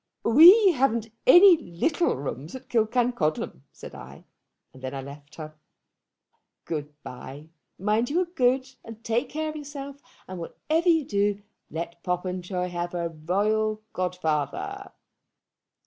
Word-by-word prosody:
'We 360 - +8
haven't 235 -6 0 0.2
any 350 +5 +9
little 310 - -1
rooms 140 - -6
at 260 0 -11
Killancodlem,' 225 - 0
said - - -11
I; - - -12 0.5
and 130 - -15
then 130 +1 -5
I 135 - -4
left 145 +2 -12
her. 155 -1 -8 1.1
"Good 150 -2 -4
bye. 135 +5 -10 0.3
Mind 215 +5 0
you 335 +5 +1
are - - 0
good 260 -6 +1 0.2
and 225 0 -11
take 230 +2 -1
care 310 +1 -3
of 310 - -7
yourself; 280 -1 -8 0.3
and, 185 -1 -7
whatever 320 - -1
you 320 -4 +3
do, 205 -1 0 0.3
let 170 +1 -6
Popenjoy 180 0 -3
have 175 0 -4
a 170 -1 -2
royal 210 +7 -1
godfather." 160 -6 -3
210 Hz, 130 wpm, -26 LUFS, 170-270 Hz, 1.1 s, any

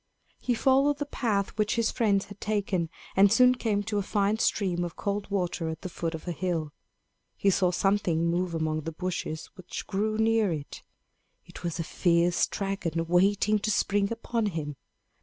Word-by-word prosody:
He 245 - 0
followed 275 +4 +3
the 290 - -2
path 215 -8 -1
which 210 0 +2
his 230 -1 +1
friends 200 -4 +1
had 205 0 -13
taken, 200 -5 -1 0.3
and 195 +1 +6
soon 250 +2 +6
came 215 -5 -1
to 210 0 -1
a - - +1
fine 205 +2 0
stream 180 -6 +1
of 175 - -5
cold 200 0 -3
water 180 -4 -1
at 160 0 -6
the 185 - -4
foot 165 -1 -3
of 160 - -9
a - - -1
hill. 165 -3 -2 0.6
He 200 - +3
saw 185 -1 +2
something 180 -3 +1
move 175 0 0
among 155 -1 -1
the 165 +2 -5
bushes 165 -2 -4
which 185 -2 -7
grew 215 +2 -1
near 220 -3 +3
it. 150 -3 -5 0.6
It - - -12
was 170 0 -2
a - - 0
fierce 170 +1 +2
dragon, 190 -5 -2
waiting 200 +5 +3
to 215 - -2
spring 200 0 +1
upon 230 -1 -1
him. 155 -6 -4
195 Hz, 180 wpm, -28 LUFS, 170-210 Hz, 0.6 s, and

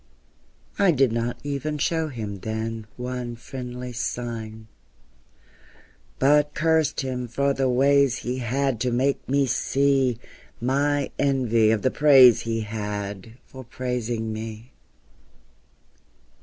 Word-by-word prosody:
I 200 -2 +4
did 135 -6 +3
not 115 +1 -2
even 145 +1 -3
show 160 +2 0
him 110 -8 -6
then 110 +1 -4
One 125 -1 -4
friendly 125 0 -7
sign; 115 -2 -5 1.5
But 145 +2 +3
cursed 160 -1 +1
him 125 -2 -3
for 140 +4 0
the 135 -1 0
ways 140 +1 +3
he 125 +2 -4
had 130 0 -1
To 125 - 0
make 130 +3 0
me 140 +1 +3
see 135 -1 +1 0.4
My 140 +3 0
envy 125 -6 +2
of 110 -1 +1
the 130 - +2
praise 135 -5 +7
he 115 0 -2
had 105 -1 -5
For 130 0 -11
praising 120 -2 -3
me. 110 +2 -7
125 Hz, 115 wpm, -24 LUFS, 115-140 Hz, 1.5 s, praise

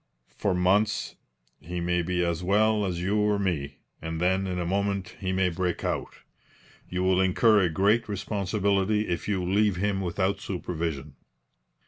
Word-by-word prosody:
For 100 -3 0
months 100 +4 +1 0.4
he 90 +2 -5
may 90 0 0
be 90 +1 0
as 85 0 -1
well 105 +2 +2
as 85 -2 -3
you 100 +3 +1
or 105 0 +2
me, 85 -8 -2 0.2
and 80 0 -4
then 95 +2 +1
in 90 -1 -3
a 90 - -2
moment 100 +1 -1
he 95 -2 -2
may 95 0 +2
break 90 0 -2
out. - - -3 0.7
You 90 +1 -2
will 95 0 +3
incur 105 +4 +4
a 90 - +2
great 105 +7 +2
responsibility 100 +1 0
if 85 -1 -3
you 95 -4 -1
leave 100 +1 +2
him 100 +1 -1
without 95 +2 -1
supervision.' 80 -6 -4
95 Hz, 160 wpm, -27 LUFS, 90-100 Hz, 0.7 s, incur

